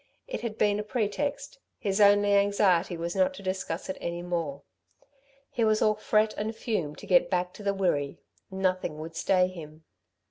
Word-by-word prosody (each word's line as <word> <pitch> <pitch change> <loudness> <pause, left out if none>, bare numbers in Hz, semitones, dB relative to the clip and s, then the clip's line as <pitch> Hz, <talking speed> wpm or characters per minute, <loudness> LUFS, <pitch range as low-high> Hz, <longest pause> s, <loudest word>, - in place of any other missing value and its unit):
It - - -4
had 225 -2 -4
been 205 0 +2
a - - -2
pretext; 260 - -2 0.2
his 200 0 0
only 205 0 +5
anxiety 200 -4 +3
was 170 +1 -3
not 280 0 +2
to 230 - -10
discuss 185 -2 -3
it 190 - -5
any 170 0 -4
more. 165 -5 -3 0.9
He 235 - 0
was 215 -1 +3
all 215 - +4
fret 215 0 +1
and 215 +2 -3
fume 180 -10 -2
to - - -11
get 180 -2 +4
back 180 -1 -1
to - - -11
the 200 -1 0
Wirree. 145 -8 0 0.3
Nothing 185 -4 -1
would 160 +1 -8
stay 185 +1 +3
him. 160 -3 -10
195 Hz, 180 wpm, -28 LUFS, 175-215 Hz, 0.9 s, only